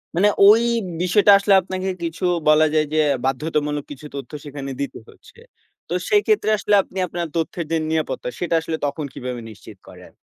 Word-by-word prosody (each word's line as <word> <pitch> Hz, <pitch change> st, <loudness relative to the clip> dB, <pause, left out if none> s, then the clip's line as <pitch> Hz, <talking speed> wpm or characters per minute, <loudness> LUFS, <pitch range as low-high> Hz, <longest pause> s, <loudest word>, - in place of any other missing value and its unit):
মানে 200 Hz, +4 st, +4 dB, 0.2 s
ওই 215 Hz, +3 st, +7 dB, 0.4 s
বিষয়টা 205 Hz, +3 st, +4 dB
আসলে 200 Hz, 0 st, +2 dB
আপনাকে 185 Hz, +1 st, -4 dB
কিছু 165 Hz, +2 st, -5 dB, 0.2 s
বলা 155 Hz, +1 st, +6 dB
যায় 155 Hz, -1 st, +2 dB
যে -, -, +1 dB, 0.3 s
বাধ্যতামূলক 150 Hz, +2 st, -1 dB
কিছু 145 Hz, +1 st, -10 dB
তথ্য 140 Hz, -, -7 dB
সেখানে 140 Hz, -1 st, -6 dB
দিতে 140 Hz, -, -5 dB
হচ্ছে। 440 Hz, -, -19 dB, 0.5 s
তো -, -, -4 dB, 0.2 s
সেই 415 Hz, -3 st, +4 dB
ক্ষেত্রে 425 Hz, -, +2 dB
আসলে 205 Hz, 0 st, +1 dB
আপনি 190 Hz, -, -13 dB
আপনার 170 Hz, 0 st, -4 dB
তথ্যের 165 Hz, +1 st, -2 dB
যে 165 Hz, -, +2 dB
নিরাপত্তা, 160 Hz, -5 st, -2 dB
সেটা 175 Hz, -1 st, 0 dB
আসলে 160 Hz, 0 st, -4 dB
তখন 145 Hz, +1 st, -3 dB
কিভাবে 125 Hz, -1 st, -6 dB
নিশ্চিত 110 Hz, -, -13 dB
করেন? -, -, -14 dB
160 Hz, 175 wpm, -21 LUFS, 145-190 Hz, 0.5 s, ওই